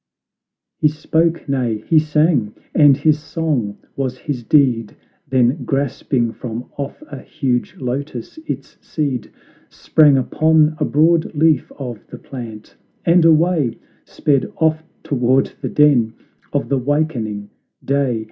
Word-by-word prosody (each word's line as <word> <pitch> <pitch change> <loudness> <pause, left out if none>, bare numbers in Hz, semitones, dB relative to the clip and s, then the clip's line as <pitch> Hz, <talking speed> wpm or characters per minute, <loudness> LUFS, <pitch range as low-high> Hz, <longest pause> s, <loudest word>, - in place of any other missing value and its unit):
He 150 - +4
spoke, 160 +2 0
nay, 120 -6 -1
he 160 - +5
sang, 150 -7 +1 0.2
and 145 -3 +6
his 150 +1 +2
song 150 -9 -2 0.2
was 130 -2 -3
his 130 -3 -5
deed; 120 -5 +2 0.3
Then, 130 +1 +2
grasping 130 -3 -1
from 120 0 -7
off 140 - -6
a - - -8
huge 130 -5 -2
lotus 130 - -5
its - - -6
seed 140 -7 -3 0.4
Sprang 150 -3 +4
upon 155 +4 +3
a - - +1
broad 160 +2 +2
leaf 155 -2 +2
of 125 -6 -7
the - - -10
plant, 115 -5 -9 0.3
and 170 0 +5
away 160 -5 +3 0.3
Sped 140 -3 0
off 160 -1 +1 0.2
toward 130 -1 +1
the - - -3
den 125 -7 +3 0.4
of 145 - -1
the 140 -1 +1
wakening 125 -8 -2 0.3
Day. 135 -4 +1
140 Hz, 130 wpm, -19 LUFS, 125-155 Hz, 0.4 s, and